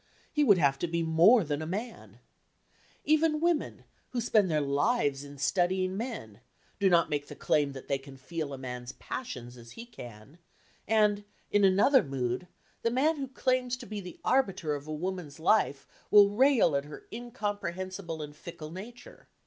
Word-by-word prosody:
He 300 Hz, -, +3 dB
would 205 Hz, -9 st, +6 dB
have 140 Hz, -4 st, +2 dB
to 175 Hz, -, -1 dB
be 170 Hz, 0 st, -1 dB
more 170 Hz, +8 st, +5 dB
than 155 Hz, +1 st, -3 dB
man! 220 Hz, +6 st, -6 dB, 0.9 s
Even 310 Hz, 0 st, +3 dB
women, 335 Hz, -1 st, 0 dB, 0.3 s
who 250 Hz, -, -3 dB
spend 215 Hz, -4 st, +3 dB
their 155 Hz, -2 st, +2 dB
lives 145 Hz, -, +1 dB
in 145 Hz, 0 st, -11 dB
studying 185 Hz, +6 st, +1 dB
men, 200 Hz, -, -6 dB, 0.4 s
do 195 Hz, -1 st, +4 dB
not 170 Hz, -3 st, +3 dB
make 145 Hz, -1 st, -2 dB
the -, -, -9 dB
claim 145 Hz, -2 st, +1 dB
that 135 Hz, -, -10 dB
they 140 Hz, -1 st, 0 dB
can 135 Hz, 0 st, -13 dB
feel 155 Hz, +2 st, -5 dB
a 135 Hz, -, -5 dB
man's 125 Hz, -1 st, -6 dB
passions 125 Hz, -, -7 dB
as 120 Hz, -1 st, -13 dB
he 230 Hz, -, -9 dB
can; 120 Hz, -, -12 dB, 0.5 s
and, 210 Hz, -1 st, +3 dB, 0.3 s
in 205 Hz, 0 st, +3 dB
another 200 Hz, +8 st, +5 dB
mood, 130 Hz, +3 st, -3 dB, 0.3 s
the 230 Hz, -, +1 dB
man 290 Hz, +7 st, +2 dB
who 275 Hz, -1 st, -3 dB
claims 255 Hz, -1 st, 0 dB
to 250 Hz, -, -10 dB
be 210 Hz, -2 st, -5 dB
the 180 Hz, -1 st, -10 dB
arbiter 195 Hz, -, +1 dB
of 145 Hz, +1 st, -6 dB
a -, -, -5 dB
woman's 170 Hz, -1 st, -4 dB
life 145 Hz, -, +2 dB, 0.2 s
will 205 Hz, -1 st, +7 dB
rail 245 Hz, -, +4 dB
at 140 Hz, 0 st, 0 dB
her 150 Hz, -, -11 dB
incomprehensible 195 Hz, -7 st, -4 dB
and 150 Hz, 0 st, -9 dB
fickle 155 Hz, -1 st, -9 dB
nature. 235 Hz, -, -11 dB
180 Hz, 175 wpm, -29 LUFS, 145-230 Hz, 0.9 s, will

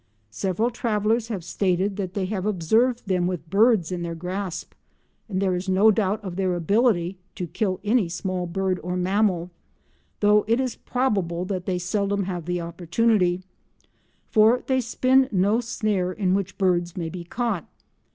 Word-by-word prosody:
Several 195 Hz, -, -1 dB
travellers 225 Hz, -1 st, 0 dB
have 205 Hz, -7 st, -4 dB
stated 185 Hz, +2 st, 0 dB
that 185 Hz, -3 st, -4 dB
they 195 Hz, -2 st, 0 dB
have 190 Hz, 0 st, -2 dB
observed 220 Hz, +7 st, +1 dB
them 180 Hz, -3 st, +1 dB
with 180 Hz, -3 st, -4 dB
birds 210 Hz, -5 st, +4 dB
in 180 Hz, -1 st, -3 dB
their 170 Hz, -1 st, -4 dB
grasp, 180 Hz, +1 st, -5 dB, 0.6 s
and 185 Hz, -2 st, -1 dB
there 190 Hz, -1 st, +1 dB
is 180 Hz, +2 st, -3 dB
no 200 Hz, +4 st, +5 dB
doubt 210 Hz, 0 st, 0 dB
of 185 Hz, -3 st, -6 dB
their 185 Hz, -2 st, +1 dB
ability 185 Hz, 0 st, +1 dB, 0.2 s
to 180 Hz, -, -3 dB
kill 185 Hz, +2 st, -2 dB
any 210 Hz, -3 st, +2 dB
small 180 Hz, +1 st, -3 dB
bird 185 Hz, +1 st, -1 dB
or 180 Hz, +1 st, -3 dB
mammal, 180 Hz, -1 st, +1 dB, 0.7 s
though 210 Hz, 0 st, +4 dB
it 230 Hz, +3 st, +2 dB
is 255 Hz, -2 st, -1 dB
probable 195 Hz, -9 st, -1 dB
that 185 Hz, -2 st, -4 dB
they 185 Hz, -2 st, 0 dB
seldom 200 Hz, +2 st, -1 dB
have 180 Hz, -3 st, -4 dB
the 180 Hz, +1 st, -1 dB
opportunity, 180 Hz, +2 st, +1 dB, 0.9 s
for 220 Hz, +3 st, +5 dB
they 260 Hz, -1 st, +1 dB
spin 260 Hz, +3 st, +3 dB
no 205 Hz, +4 st, +2 dB
snare 210 Hz, -6 st, -1 dB
in 185 Hz, -1 st, 0 dB
which 195 Hz, -1 st, -2 dB
birds 175 Hz, -3 st, +1 dB
may 170 Hz, -2 st, -2 dB
be 175 Hz, 0 st, -7 dB
caught. 215 Hz, 0 st, -2 dB
190 Hz, 165 wpm, -24 LUFS, 180-215 Hz, 0.9 s, no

